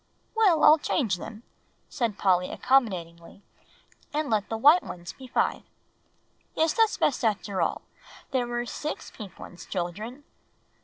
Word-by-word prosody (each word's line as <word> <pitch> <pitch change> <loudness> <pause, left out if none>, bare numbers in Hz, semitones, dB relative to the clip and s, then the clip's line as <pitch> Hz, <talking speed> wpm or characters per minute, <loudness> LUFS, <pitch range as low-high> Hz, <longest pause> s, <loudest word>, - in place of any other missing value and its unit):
"Well, 410 -8 +4
I'll 310 +1 +8
change 225 - 0
them," 220 +5 -9 0.4
said 230 -6 -2
Polly 180 -2 +2
accommodatingly, 185 -8 0 0.7
"and 300 -3 -2
let 210 -2 +1
the 225 - -2
white 295 +10 +6
ones 175 -1 -8
be 260 - -12
five. - - 0 0.9
Yes, 320 0 +2
that's 450 -2 +2
best 270 - +1
after 205 -3 0
all, 165 - -1 0.5
there 250 -2 0
were 240 0 -2
six 300 +5 -5
pink 200 -5 -10
ones, 175 -1 -11
children. 210 +9 -5
225 Hz, 140 wpm, -27 LUFS, 185-290 Hz, 0.9 s, I'll